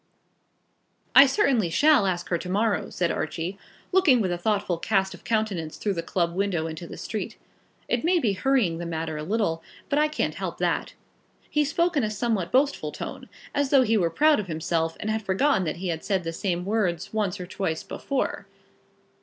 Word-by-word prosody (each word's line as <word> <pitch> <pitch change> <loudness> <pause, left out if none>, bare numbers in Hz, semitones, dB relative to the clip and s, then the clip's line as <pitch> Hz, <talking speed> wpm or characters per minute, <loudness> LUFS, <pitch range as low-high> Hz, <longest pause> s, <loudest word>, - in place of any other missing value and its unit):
"I 275 +1 +10
certainly 260 - +2
shall 290 - +4
ask 175 -2 -2
her 170 - +1
to 180 - -7
morrow," 210 +3 +1
said 175 -2 0
Archie, 170 +5 -3 0.3
looking 360 -10 +5
with 190 -5 0
a 175 - -1
thoughtful 200 -3 0
cast 190 -1 +1
of 185 - -13
countenance 205 -8 -1
through 205 - -1
the 170 - -2
club 170 0 -1
window 185 -4 0
into 165 +1 -6
the - - -9
street. - - -5 0.5
"It 240 - 0
may 355 +2 +3
be 230 -11 +1
hurrying 200 -7 +1
the 170 - -4
matter 160 -1 -3
a 150 - -4
little, 175 -3 0 0.3
but 285 - +2
I 305 - +4
can't 305 - -1
help - - -5
that." - - -1 0.6
He 300 - +3
spoke 340 +4 +1
in 280 - +2
a 215 - 0
somewhat 215 -4 -1
boastful 280 +2 +1
tone, - - -7 0.2
as 285 -1 +1
though 270 -2 +6
he 225 -2 +2
were 175 -6 +2
proud 300 - +4
of 205 - -4
himself 165 0 -1
and 215 - -2
had 220 0 -1
forgotten 195 +1 +2
that 155 - -2
he 180 +1 -3
had 165 -1 -3
said 195 -2 0
the 165 0 -4
same 180 0 -2
words 190 -5 -1
once 205 -5 -1
or 180 - -5
twice 175 -3 -3
before. 275 -2 -3
195 Hz, 200 wpm, -26 LUFS, 170-245 Hz, 0.6 s, I